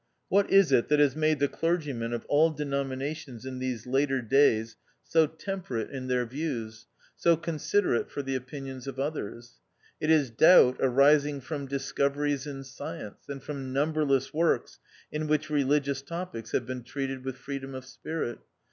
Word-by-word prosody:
What 200 0 +3
is 195 -6 +5
it 125 -3 +4
that 150 - +3
has 145 -2 +4
made 155 0 +2
the 140 - +2
clergymen 150 -9 -1
of 120 -1 -4
all 155 +3 +4
denominations 140 -3 -4
in 130 -1 -5
these 130 -4 -3
later 135 +1 +1
days 115 -3 +3 0.3
so 160 -1 +3
tem 190 +5 -5
perate 115 -9 -4
in 130 -2 -5
their 125 -1 +1
views, 115 -5 -5 0.3
so 170 -1 +3
considerate 165 -1 0
for 140 - -4
the 135 0 -3
opinions 130 0 -6
of 135 - -5
others? 120 -5 -5 0.4
It 155 - -1
is 150 -6 +4
Doubt 130 0 +7
arising 140 +2 +4
from 140 +1 -5
discoveries 140 +1 -1
in 135 -1 -6
science, 115 -6 -8
and 140 -1 -6
from 135 -3 -5
numberless 145 -2 +1
works 165 +2 +1 0.3
in 155 0 -2
which 155 0 0
religious 140 -1 +1
topics 155 -7 -6
have 120 - +1
been 130 0 -5
treated 135 +1 -4
with 130 -1 -5
freedom 135 0 -6
of 130 0 -7
spirit. 135 -1 -5
140 Hz, 165 wpm, -28 LUFS, 130-150 Hz, 0.4 s, Doubt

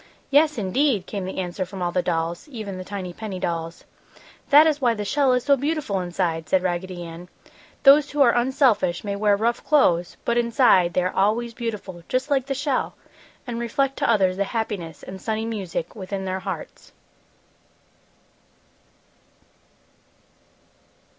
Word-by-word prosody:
"Yes, 300 +1 +4
indeed!" 220 +1 +1
came 195 -2 -5
the 190 - -6
answer 185 0 -3
from 185 0 -6
all 175 - 0
the 180 - +1
dolls, 170 - -2
even 215 -9 -6
the - - -5
tiny 185 -2 -6
penny 200 -2 -6
dolls. 165 -1 -4 0.7
"That 295 +2 +8
is 300 -2 +1
why 240 -3 +3
the 210 -1 -4
shell 275 +4 +2
is 250 -1 +1
so 285 -1 +4
beautiful 285 -7 -1
inside!" 170 -3 -2
said 185 -1 +2
Raggedy 180 0 -3
Ann. 170 +1 -10 0.5
"Those 290 +1 +7
who 290 - -1
are 235 - +4
unselfish 240 - +2
may 200 -1 -3
wear 205 0 +2
rough 235 +3 0
clothes, 175 - +2
but 235 0 +2
inside 235 -7 +3
they 180 - +2
are 185 - -1
always 225 +4 +1
beautiful, 210 -7 -5
just 260 +3 -1
like 270 -2 +1
the 275 - -2
shell, 280 -1 -1 0.5
and 235 -1 -4
reflect 270 +4 0
to - - 0
others 190 -5 +3
the 200 - +1
happiness 195 -8 -4
and 190 0 -9
sunny 220 0 -2
music 195 -7 -4
within 195 -1 -5
their 185 0 -2
hearts!" 190 -3 -7
205 Hz, 160 wpm, -23 LUFS, 185-250 Hz, 0.7 s, That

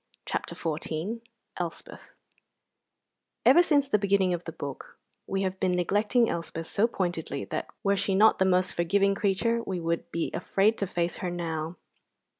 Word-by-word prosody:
CHAPTER - - -3
XIV 165 +7 -3 0.4
ELSPETH 170 -2 -6 1.3
Ever 345 - +8
since 290 -5 +3
the 210 -6 +2
beginning 195 -2 +2
of 175 0 -4
the 165 - -5
book 140 -4 -8 0.3
we 195 0 -1
have 190 0 -2
been 185 -1 +1
neglecting 210 +7 +2
Elspeth 165 -2 -4
so 210 +7 +2
pointedly 175 - -3
that - - -4 0.2
were 200 0 +3
she 195 0 0
not 215 +3 +5
the 190 - +4
most 185 0 +2
forgiving 195 +4 +2
creature 205 +4 +1
we 190 -5 -3
should 170 0 -2
be 170 - -2
afraid 210 +3 +1
to 200 - 0
face 175 0 -1
her 180 - -3
now. 165 -1 -4
190 Hz, 160 wpm, -28 LUFS, 170-205 Hz, 1.3 s, Ever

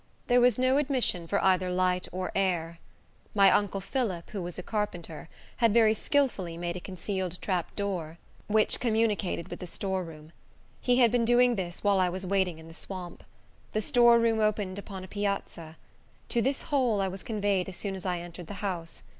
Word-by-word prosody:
There 245 0 +4
was 245 -3 +4
no 255 +1 +3
admission 255 - +1
for 200 - +1
either 185 -1 +3
light 180 0 +1
or 185 +1 -3
air. 170 -4 -1 0.6
My 195 -2 +7
uncle 200 -1 +1
Phillip, 195 -6 -2
who 200 - -4
was 175 0 -6
a 180 - -5
carpenter, 175 -7 -4 0.3
had 230 -2 +3
very 220 -2 +6
skilfully 220 - 0
made 175 0 -3
a - - -4
concealed 185 -1 -4
trap 180 -4 -2
door, 180 -6 -3 0.3
which 215 0 +2
communicated 215 -6 0
with - - -7
the 180 - -6
storeroom. 165 -5 -4 0.5
He 245 - +3
had 240 -3 +5
been 245 -1 +2
doing 240 +1 +4
this 175 -3 -5
while 200 -2 +3
I 185 -1 +3
was 185 +2 -4
waiting 185 -3 +1
in 160 0 -12
the 165 - -12
swamp. 180 0 -8 0.5
The 215 - +1
storeroom 235 -1 +4
opened 205 -3 0
upon 195 -2 -8
a - - -9
piazza. 195 -5 -4 0.5
To 235 - +1
this 270 +3 0
hole 255 -8 +1
I 195 - +1
was 190 0 -6
conveyed 200 -4 0
as 185 - -9
soon 200 -2 -3
as 190 - -6
I 180 -2 -1
entered 175 -1 -9
the 205 - -7
house. 170 -4 -4
195 Hz, 190 wpm, -28 LUFS, 180-220 Hz, 0.6 s, My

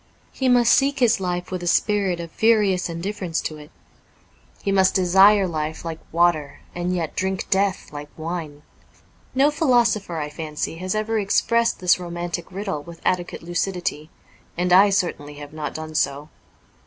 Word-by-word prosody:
He 260 -1 0
must 245 -1 +5
seek 280 +1 +2
his 240 -5 +3
life 180 0 -3
in 180 - -3
a 175 - -4
spirit 195 -2 +1
of 170 -1 -7
furious 210 -5 +2
indifference 170 0 -3
to 155 -1 -5
it; 150 0 -13 0.9
he 200 - 0
must 190 -1 +3
desire 195 +2 +5
life 155 -1 -4
like 165 -1 -5
water 165 -4 +1
and 175 +1 -2
yet 165 -3 -3
drink 190 0 -2
death 195 -4 0
like 145 0 -7
wine. 160 -3 -5 0.7
No 280 +3 +4
philo 275 -6 +3
sopher, 205 -7 -2
I 150 -1 -4
fancy, 155 0 -4
has 185 +3 -3
ever 215 +1 0
expressed 230 +3 +1
this 180 0 +3
romantic 175 0 -5
riddle 190 -5 -4
with 170 +2 -12
adequate 175 -2 -1
lucidity, 175 -3 -3 0.5
and 180 0 +1
I 195 +3 +7
certainly 170 -7 -2
have 145 0 -10
not 155 -1 -5
done 155 0 -6
so. 145 0 -1
180 Hz, 165 wpm, -22 LUFS, 160-200 Hz, 0.9 s, I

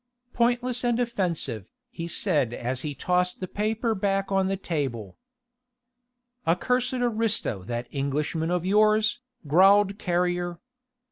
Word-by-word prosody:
"Pointless 245 +1 +1
and 240 -1 +1
offensive," 175 - -2 0.2
he 165 0 -5
said 150 - 0
as 125 +2 -3
he 145 -1 -4
tossed 180 +5 0
the 185 - -4
paper 220 +4 -1
back 195 -1 -1
on 195 -1 +2
the 195 0 -1
table. 135 - -3 1.3
"A 165 - +3
cursed 250 +6 0
aristo 225 - 0
that 120 +2 -3
Englishman 150 +4 -1
of 180 0 0
yours," 215 +3 +3 0.3
growled 195 +6 +5
Carrier. 175 -1 0
185 Hz, 125 wpm, -26 LUFS, 150-215 Hz, 1.3 s, growled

